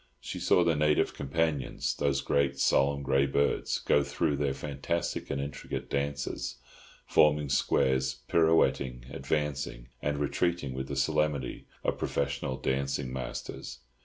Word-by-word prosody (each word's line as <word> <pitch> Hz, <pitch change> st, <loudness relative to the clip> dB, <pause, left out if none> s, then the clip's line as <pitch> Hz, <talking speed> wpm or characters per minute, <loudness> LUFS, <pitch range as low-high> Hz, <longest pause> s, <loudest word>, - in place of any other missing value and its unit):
She -, -, -6 dB
saw 90 Hz, -, +4 dB
the 85 Hz, -2 st, +2 dB
native 75 Hz, 0 st, +2 dB
companions, 75 Hz, 0 st, -1 dB
those 70 Hz, -1 st, 0 dB
great, 70 Hz, 0 st, +1 dB
solemn, 70 Hz, +1 st, +3 dB
grey 70 Hz, 0 st, +3 dB
birds, 70 Hz, +1 st, +1 dB
go 75 Hz, -, +3 dB
through 70 Hz, +1 st, 0 dB
their 70 Hz, -1 st, 0 dB
fantastic 75 Hz, +4 st, -3 dB
and 70 Hz, -, -1 dB
intricate 70 Hz, 0 st, -5 dB
dances, 70 Hz, -2 st, -2 dB, 0.5 s
forming 75 Hz, -1 st, +4 dB
squares, 65 Hz, -1 st, +2 dB
pirouetting, 70 Hz, -7 st, +2 dB
advancing, 70 Hz, -3 st, -2 dB
and 70 Hz, 0 st, -1 dB
retreating 75 Hz, 0 st, 0 dB
with 65 Hz, +1 st, -4 dB
the 70 Hz, -, -4 dB
solemnity 70 Hz, -1 st, 0 dB, 0.2 s
of -, -, -1 dB
professional 70 Hz, -2 st, -1 dB
dancing 65 Hz, 0 st, -1 dB
masters. 65 Hz, -1 st, -5 dB
70 Hz, 130 wpm, -30 LUFS, 65-75 Hz, 0.5 s, saw